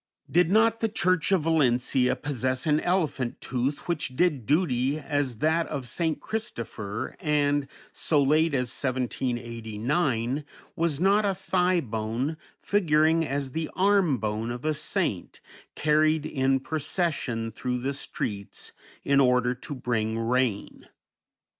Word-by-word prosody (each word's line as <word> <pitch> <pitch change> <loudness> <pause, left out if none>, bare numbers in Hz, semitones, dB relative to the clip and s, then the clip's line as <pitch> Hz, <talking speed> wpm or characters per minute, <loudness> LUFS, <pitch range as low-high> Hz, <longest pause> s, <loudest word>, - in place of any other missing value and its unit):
Did 175 0 +4
not 225 +3 +4
the 225 - 0
church 185 -3 +1
of 185 -5 +3
Valencia 130 -5 +2
possess 130 -2 -2
an 150 -1 +3
elephant 155 -9 -1
tooth 130 +3 -2
which 155 -6 -2
did 145 -7 +1
duty 140 -3 +2
as 145 -5 -2
that 165 +1 +2
of 135 -5 -5
St. 160 +5 -1
Christopher, 115 - -5
and, 145 -2 +1 0.3
so 150 - +1
late 155 +2 +3
as 125 -2 0
1789, 120 +1 -1 0.3
was 165 -4 0
not 200 +4 +4
a 200 -2 +1
thigh 180 -1 +1
bone, 115 +5 -3 0.3
figuring 160 -4 +3
as 140 -2 -3
the 160 +3 -3
arm 190 -7 +3
bone 110 +1 -2
of 120 +4 -5
a 155 - +2
saint, - - -2 0.4
carried 155 0 +2
in 135 -2 +1
procession 145 -6 -1
through 125 +3 -3
the 135 +3 -2
streets 100 -7 -5 0.3
in 140 0 +3
order 125 -2 +3
to 125 +3 -8
bring 110 -3 -1
rain? 115 -2 -1
140 Hz, 130 wpm, -27 LUFS, 125-160 Hz, 0.4 s, Did